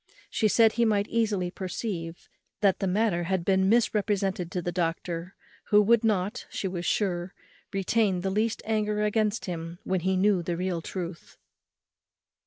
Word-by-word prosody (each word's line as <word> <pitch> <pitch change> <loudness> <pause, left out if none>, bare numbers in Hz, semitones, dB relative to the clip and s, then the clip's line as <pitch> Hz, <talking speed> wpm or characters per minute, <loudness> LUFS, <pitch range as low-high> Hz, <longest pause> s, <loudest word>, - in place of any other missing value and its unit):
She 220 - +2
said 225 +1 +5
he 235 - +1
might 210 -2 +2
easily 205 -6 0
perceive 180 -3 -5 0.3
that 195 -3 +3
the 195 - 0
matter 185 -3 +1
had 185 -1 -1
been 190 0 +3
misrepresented 200 -5 +1
to 180 - -2
the 175 0 -3
doctor, 170 +1 -3 0.3
who 210 - +5
would 225 +2 +4
not, 205 -3 0
she 195 - -3
was 175 -2 -4
sure, 180 -3 -1 0.4
retain 195 -1 +1
the 190 +1 -1
least 215 +3 0
anger 210 -1 0
against 210 +1 0
him 170 -1 -5
when 190 0 0
he 190 +2 0
knew 195 -1 +3
the 170 0 -3
real 180 -2 -2
truth. 170 0 -7
190 Hz, 160 wpm, -27 LUFS, 175-210 Hz, 0.4 s, said